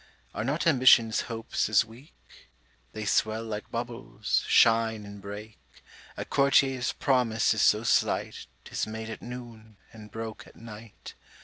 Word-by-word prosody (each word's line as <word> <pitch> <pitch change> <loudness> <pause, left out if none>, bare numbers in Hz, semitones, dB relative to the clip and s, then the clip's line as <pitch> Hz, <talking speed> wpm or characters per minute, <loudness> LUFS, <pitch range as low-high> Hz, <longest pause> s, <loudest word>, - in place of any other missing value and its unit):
Are - - -3
not 140 +7 -1
Ambition's 125 -7 +5
hopes 115 -2 -2
as 110 0 +4
weak? 120 +7 -16 0.8
They 110 -1 -6
swell 110 +2 +1
like 110 -1 -6
bubbles, 120 0 -3
shine 115 -2 +3
and 100 0 -11
break. 105 +2 -9 0.6
A - - -4
Courtier's 135 -2 +2
promise 125 -6 +1
is 110 - -1
so 105 +1 +4
slight, 115 - 0 0.2
'Tis - - -3
made 110 +1 -6
at - - -8
noon, 115 -3 -10 0.2
and 110 -1 -12
broke 110 0 -7
at - - -18
night. 110 -1 -12
115 Hz, 140 wpm, -27 LUFS, 110-120 Hz, 0.8 s, Ambition's